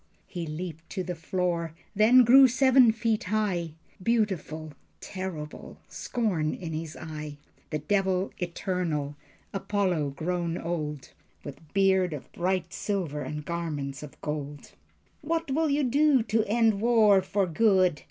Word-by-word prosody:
He 175 -4 -6
leaped 160 +1 -6
to 185 - -3
the 180 0 -4
floor, 170 -1 -2 0.2
then 235 +5 +7
grew 260 +3 +8
seven 260 -1 +5
feet 225 -1 -1
high, 185 -6 -1 0.3
Beautiful, 180 -9 -1 0.3
terrible, 180 -6 -7
scorn 185 -11 -1
in 165 -3 -6
his 160 0 -5
eye: 150 -2 -7 0.3
The 155 - -1
Devil 190 +4 0
Eternal, 170 -5 -2 0.4
Apollo 190 -8 -1
grown 170 +2 -2
old, 150 -5 -4 0.3
With 145 +2 -11
beard 190 -3 +3
of 145 - -8
bright 180 -1 -1
silver 175 -8 -2
and 150 0 -5
garments 150 -5 -4
of 150 -2 -11
gold. 145 -1 -5 0.5
"What 325 -1 -2
will 315 +3 +1
you 285 +1 +1
do 275 0 +3
to 220 0 +1
end 220 -1 +2
war 220 -4 +5
for 195 +1 0
good? 185 -3 +3
180 Hz, 135 wpm, -27 LUFS, 155-215 Hz, 0.5 s, grew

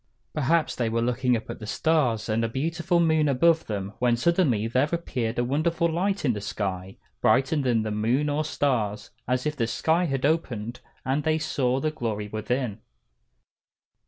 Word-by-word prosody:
Perhaps 155 +2 +1
they 120 -2 0
were 115 +1 0
looking 125 0 +1
up 110 - -9
at - - -7
the 105 - -8
stars 135 -7 +1
and 110 +1 +1
the 115 - +1
beautiful 165 +7 0
moon 160 -3 +3
above 160 +4 +3
them, 100 -1 -4
when 120 -1 +2
suddenly 135 - +2
there 130 +5 +1
appeared 125 -9 -2
a 120 - +2
wonderful 160 +6 +1
light 185 +3 -1
in 125 - +3
the 105 - -5
sky, 95 -2 -4 0.2
brighter 135 +4 +3
than 125 -6 +1
the 110 - -3
moon 115 +8 +1
or 145 +1 0
stars, 125 -9 -1 0.2
as 125 +2 0
if 150 0 -1
the 115 -5 0
sky 160 +10 +1
had 135 -4 -1
opened 120 -7 -1 0.3
and 135 +3 +1
they 155 0 +2
saw 135 -4 0
the 155 +3 0
glory 110 -7 -3
within. 110 +1 -2
130 Hz, 180 wpm, -26 LUFS, 115-155 Hz, 0.3 s, moon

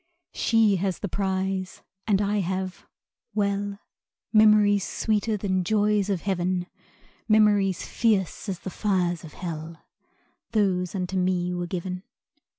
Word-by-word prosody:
She 220 -4 +3
has 190 0 -1
the 205 - -4
prize, 190 0 -2 0.2
and 205 -1 +3
I 205 +1 +1
have 185 0 -3 0.5
well, 200 -1 0 0.6
Memories 210 -2 +5
sweeter 215 +1 0
than 190 -2 0
joys 210 +1 +2
of 190 -4 0
heaven; 185 -2 -1 0.6
Memories 205 -4 +3
fierce 210 -3 0
as 185 -3 -4
the 190 - -6
fires 180 -5 0
of 160 - -10
hell 165 -2 -7 0.7
Those 185 -4 +1
unto 185 0 -2
me 180 -1 0
were 175 0 -3
given. 180 +1 -4
190 Hz, 125 wpm, -26 LUFS, 180-205 Hz, 0.7 s, Memories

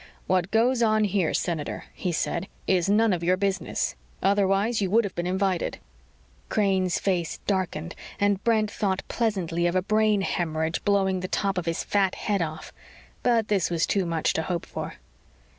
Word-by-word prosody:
"What 185 -1 +1
goes 235 +3 +2
on 215 -1 +3
here, 195 -5 +1
Senator," 160 -4 -2
he 180 - -2
said, 170 +2 -1 0.2
"is 185 -1 +2
none 215 0 +4
of 170 -2 -2
your 180 +2 +3
business. 195 - -1 0.3
Otherwise, 200 +3 +2
you 195 - 0
would 230 +4 +4
have 200 - -4
been 175 0 -3
invited." 190 -1 0 0.7
Crane's 190 -4 +1
face 180 -4 -1
darkened 185 -4 -1 0.3
and 200 -1 +1
Brent 215 -3 +2
thought 195 -2 -1
pleasantly 180 -7 0
of 175 - -1
a 185 - +2
brain 215 0 +2
hemorrhage 160 -3 -1
blowing 195 -2 +2
the 185 - -4
top 195 +1 0
of 175 -2 -3
his 165 - -1
fat 195 -2 +1
head 205 -3 -1
off. 155 -1 -5 0.5
But 230 -3 +2
this 195 -6 +1
was 170 -1 +1
too 195 -3 0
much 165 -2 0
to - - 0
hope 170 +1 -3
for. - - -6
190 Hz, 175 wpm, -26 LUFS, 175-205 Hz, 0.7 s, none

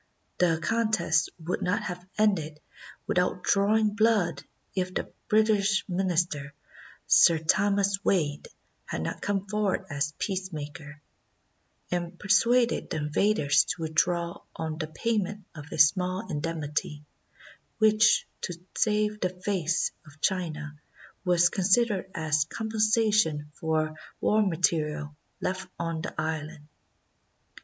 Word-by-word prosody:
The 165 -3 +3
contest 215 -6 +1
would 170 +1 -3
not 205 +4 0
have 180 -2 -5
ended 165 -8 +1 0.5
without 180 0 0
drawing 210 +2 +3
blood 210 -9 +2 0.3
if 185 -2 -1
the - - -3
British 210 -2 +2
Minister, 175 -6 -1 0.5
Sir 170 - +6
Thomas 200 +4 +1
Wade, 150 -6 0 0.4
had - - -4
not - - -4
come 200 -1 -1
forward 210 -2 0
as 145 +2 -2
peacemaker, 150 -6 -5 0.9
and 175 0 -3
per 200 - -10
suaded 235 +3 +3
the - - -2
invaders 150 -1 +2
to 165 0 -3
withdraw 170 +2 0
on 160 -1 -4
the 155 - -2
payment 205 +3 -2
of 145 -1 -10
a - - -5
small 185 +6 +3
indemnity, 150 -1 -3 0.7
which, 215 0 +4 0.2
to 175 - -4 0.2
save 210 0 +1
the 185 - 0
"face" 180 -2 -1 0.2
of 150 +1 -16
China, 155 -5 -2 0.4
was 175 -1 +4
considered 195 +1 +2
as 155 -2 +1
compensation 215 -7 +1
for 155 0 -1 0.3
war 215 +1 +3
material 155 -5 0 0.3
left 185 0 -3
on 165 -1 -3
the 160 - -6
island. 155 -1 -4
180 Hz, 115 wpm, -27 LUFS, 155-205 Hz, 0.9 s, Sir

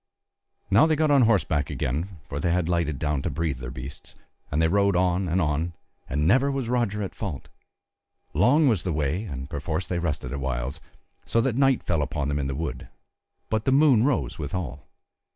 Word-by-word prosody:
Now 110 +10 +6
they 160 - +2
got 155 0 +2
on 140 -2 +6
horseback 80 -9 +1
again, 85 +9 -3
for 70 - -4
they 85 +4 0
had 90 -1 +1
lighted 85 -5 0
down 75 -1 -1
to - - -2
breathe 80 -6 -2
their 65 -1 -6
beasts, 65 - -8 0.4
and 75 - 0
they 80 - +4
rode 100 +2 +2
on 90 +1 +2
and 85 +3 +1
on, 80 +1 0 0.4
and 75 +3 +1
never 130 +8 +4
was 135 -4 -2
Roger 115 -4 0
at 95 - -5
fault: 90 -11 -6 0.8
long 125 - +4
was 110 -9 +3
the 90 - -2
way 80 +7 -1
and 65 -7 -6
perforce 80 +3 -3
they 90 - -1
rested 75 -6 -3
at 70 - -3
whiles, 65 +3 -3 0.4
so 115 - 0
that 120 -1 0
night 135 -1 +3
fell 85 -3 0
upon 70 0 -2
them 70 0 -1
in 70 - -1
the 70 - -3
wood, 70 -5 -4 0.6
but 110 0 0
the 130 - +3
moon 135 -5 +5
rose 135 - 0
withal. 75 -3 -5
85 Hz, 200 wpm, -25 LUFS, 75-110 Hz, 0.8 s, Now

